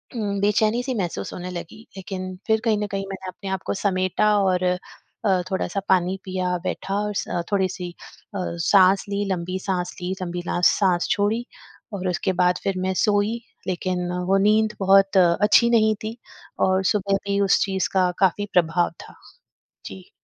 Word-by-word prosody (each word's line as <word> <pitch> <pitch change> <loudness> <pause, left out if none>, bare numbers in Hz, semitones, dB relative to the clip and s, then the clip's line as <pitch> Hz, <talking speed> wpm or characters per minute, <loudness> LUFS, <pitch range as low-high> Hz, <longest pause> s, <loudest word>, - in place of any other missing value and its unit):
उम, 205 -3 -2
बेचैनी-सी 220 +5 +1
महसूस 180 -6 -3
होने 180 0 -6
लगी। 175 +2 -8 0.2
लेकिन 185 -1 -6
फिर 220 -1 +2
कहीं 220 -2 +3
न - - -2
कहीं 195 0 -2
मैंने 190 -1 -7
अपने 195 +2 -8
आप 190 -1 -2
को - - 0
समेटा 195 +2 +1
और 185 -2 +1 0.6
अ, 190 -3 +3
थोड़ा-सा 190 0 -1
पानी 185 0 +2
पिया, 185 -1 -1
बैठा 190 +1 -3
और 210 - -3
स 175 - -2
थोड़ी-सी 185 -2 -1 0.5
अ, - - -2 0.3
साँस 195 -1 +5
ली, 200 0 -1
लंबी 185 0 -2
साँस 180 -2 -3
ली, 180 +1 -2
लंबी 175 -1 -3
ला - - -1
साँस 180 -4 +1
छोड़ी 215 +4 +1 0.5
और 190 -2 -3
उसके 180 +1 -1
बाद 180 0 +3
फिर 195 -2 -1
मैं 190 - 0
सोई। 210 +3 +1 0.3
लेकिन 180 -1 -2 0.2
वो 195 +1 +4
नींद 215 +2 +3
बहुत 195 0 +4
अच्छी 200 +6 +5
नहीं 220 -2 +4
थी 220 +2 -5 0.5
और 190 0 +2
सुबह 200 0 +1
भी 200 0 +1
उस 195 - +3
चीज़ 190 -2 -1
का 185 -2 +3
काफ़ी 195 +1 +2
प्रभाव 175 0 +2 0.2
था। - - -15 0.7
जी। 185 -1 -10
190 Hz, 170 wpm, -23 LUFS, 185-205 Hz, 0.7 s, साँस